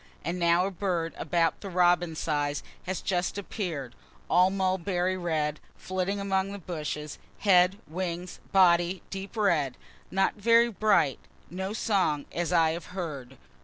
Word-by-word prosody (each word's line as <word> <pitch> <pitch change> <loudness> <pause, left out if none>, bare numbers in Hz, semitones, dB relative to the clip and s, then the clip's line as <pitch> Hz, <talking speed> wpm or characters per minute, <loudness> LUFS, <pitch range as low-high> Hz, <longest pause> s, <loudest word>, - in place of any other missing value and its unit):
And 175 +2 -2
now 170 +1 +3
a 195 - -2
bird 175 -3 -2
about 165 0 0
the 200 - -6
robin 175 -2 +3
size 145 -2 -1 0.2
has 185 0 -2
just 180 0 -1
appear'd, 170 - -4 0.4
all 180 +2 +6
mulberry 185 -1 0
red, 155 -4 -1 0.2
flitting 185 +2 -2
among 195 0 0
the 200 - -5
bushes 150 -4 -5 0.2
head, 185 -1 +5
wings, 175 +1 -4
body, 175 -1 +4
deep 195 +3 -6
red, 155 -11 +1 0.3
not 195 0 +2
very 230 +3 +4
bright 205 - +2 0.3
no 190 +2 -3
song, 195 -9 +1
as 175 0 -2
I 165 -2 +4
have 170 +2 -6
heard. 140 -7 -5
180 Hz, 140 wpm, -28 LUFS, 165-190 Hz, 0.4 s, all